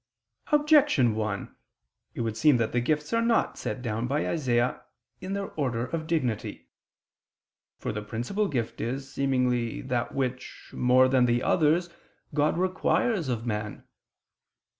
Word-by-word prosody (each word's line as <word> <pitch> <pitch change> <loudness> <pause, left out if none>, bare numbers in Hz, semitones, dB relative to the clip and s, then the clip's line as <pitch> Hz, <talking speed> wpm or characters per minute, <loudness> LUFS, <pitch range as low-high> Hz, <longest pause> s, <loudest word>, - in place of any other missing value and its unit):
Objection 295 - +4
1: 105 -2 -3 0.6
It - - -3
would 115 -2 -2
seem 145 +3 +4
that 115 -2 0
the 120 - +1
gifts 150 - -1
are 230 - +3
not 230 0 +2
set 125 - -5
down 115 0 -2
by 145 +4 0
Isaias 125 -6 +1 0.4
in 185 +1 -5
their 200 -1 -3
order 125 -5 -1
of 160 +2 -4
dignity. 130 -10 -2 1.1
For - - -4
the 105 - -4
principal 120 - -2
gift 120 -8 -3
is, 135 +4 -4
seemingly, 125 -4 0
that 120 -1 -2
which, 130 -1 -4
more 125 +1 +4
than 130 -1 +3
the 120 0 +1
others, 170 +2 +3 0.5
God 150 +2 +2
requires 185 - +1
of 115 -2 -2
man. 105 -2 -4
130 Hz, 140 wpm, -27 LUFS, 120-160 Hz, 1.1 s, Objection